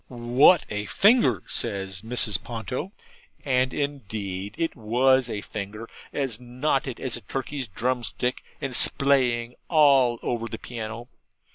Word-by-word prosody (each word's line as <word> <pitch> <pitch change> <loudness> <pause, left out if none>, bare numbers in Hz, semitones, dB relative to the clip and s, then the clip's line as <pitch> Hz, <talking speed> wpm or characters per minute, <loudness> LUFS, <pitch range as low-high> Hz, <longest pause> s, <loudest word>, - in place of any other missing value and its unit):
'What 125 +7 +4
a 105 0 -3
finger!' 195 - +4
says 95 -1 -2
Mrs. 115 -2 -1
Ponto; 120 +9 -5 0.5
and 130 -1 +2
indeed 105 -9 -4
it 165 -1 -1
WAS 125 +3 +2
a 105 -2 -3
finger, 105 +2 -6 0.2
as 130 -6 -2
knotted 130 +1 -1
as 125 -2 -2
a - - -10
turkey's 135 +1 -4
drumstick, 125 +3 -2 0.2
and 135 -4 -2
splaying 125 -4 +2 0.2
all 135 -6 +5
over 115 -1 -2
the 115 - -6
piano. 115 0 -6
120 Hz, 125 wpm, -25 LUFS, 110-135 Hz, 0.5 s, all